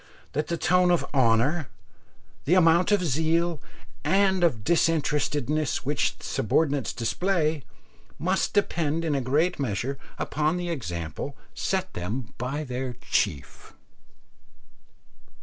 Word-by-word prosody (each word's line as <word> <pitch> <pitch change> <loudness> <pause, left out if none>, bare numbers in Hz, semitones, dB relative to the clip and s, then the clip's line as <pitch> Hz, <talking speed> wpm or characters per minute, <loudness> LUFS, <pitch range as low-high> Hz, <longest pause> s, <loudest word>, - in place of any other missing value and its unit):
that 150 +2 -1
the 170 - -1
tone 180 +1 +3
of 175 -1 +2
honour, 130 +4 +2 0.8
the 170 - +4
amount 170 +1 +5
of 200 -3 +3
zeal 160 +2 +1 0.4
and 190 -1 +3
of 125 -11 +2
disinterestedness 150 -3 +1
which 145 +2 0
subordinates 140 +5 0
display 155 +5 0 0.6
must 185 +3 0
depend 165 -5 0
in 155 - 0
a 140 - 0
great 145 +8 +1
measure 135 +2 -2 0.2
upon 155 +3 0
the 175 -1 -3
example 85 - -5 0.2
set 190 -1 -2
them 105 +7 -4
by 135 +5 -2
their 125 -2 -4 0.2
chief? 80 -10 -1
150 Hz, 115 wpm, -26 LUFS, 130-170 Hz, 0.8 s, amount